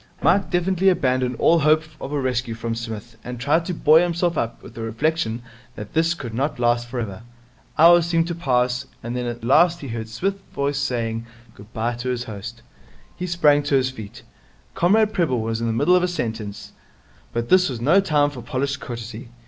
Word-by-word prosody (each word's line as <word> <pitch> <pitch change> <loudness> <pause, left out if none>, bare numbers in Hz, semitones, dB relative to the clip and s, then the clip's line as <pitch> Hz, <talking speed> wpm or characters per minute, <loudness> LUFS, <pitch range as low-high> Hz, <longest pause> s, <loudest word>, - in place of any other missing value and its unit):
Mike 200 - +3
definitely 185 +1 +2
abandoned 130 -7 +1
all 170 0 +4
hope 155 +1 +4 0.2
of 135 - -6
a 145 - -1
rescue 125 -3 -1
from 115 0 -3
Psmith, 115 0 -7
and 125 -1 -6
tried 150 +6 +1
to - - -3
buoy 155 +1 +5
himself 175 -1 0
up 115 -5 -3
with - - -12
the 115 - -8
reflection 115 +1 -1 0.3
that 105 -2 -9
this 165 +2 +2
could 120 -8 -7
not 135 +5 -1
last 120 0 +1
for 125 +1 -4
ever. 100 -4 -5 0.6
Hours 170 +1 +7
seemed 165 -1 +2
to 170 - -2
pass, 125 -4 0 0.2
and 120 +1 -4
then 125 -1 -2
at 120 -1 -5
last 165 +8 +4
he 140 - -6
heard 115 -1 -5
Psmith's 195 - -2
voice 140 0 0
saying 115 -4 -2 0.3
good 105 +2 -15
bye 115 +2 -1
to 125 +1 -4
his 125 -1 -2
host. 115 +2 -8 0.5
He 180 - -4
sprang 150 -4 +4
to 145 -1 0
his 130 -1 +2
feet. 110 -5 -10 0.5
Comrade 210 +5 +3
Prebble 165 -11 +1
was 115 0 -2
in 115 - -1
the - - +1
middle 145 +10 +3
of 180 - +4
a 180 - +1
sentence, 110 - -5 0.6
but 115 0 -3
this 185 -2 +5
was 125 -3 -5
no 150 +11 +4
time 150 -6 +2
for 130 -4 -8
polished 140 +1 -2
courtesy. 115 -1 -7
130 Hz, 205 wpm, -22 LUFS, 115-165 Hz, 0.6 s, Hours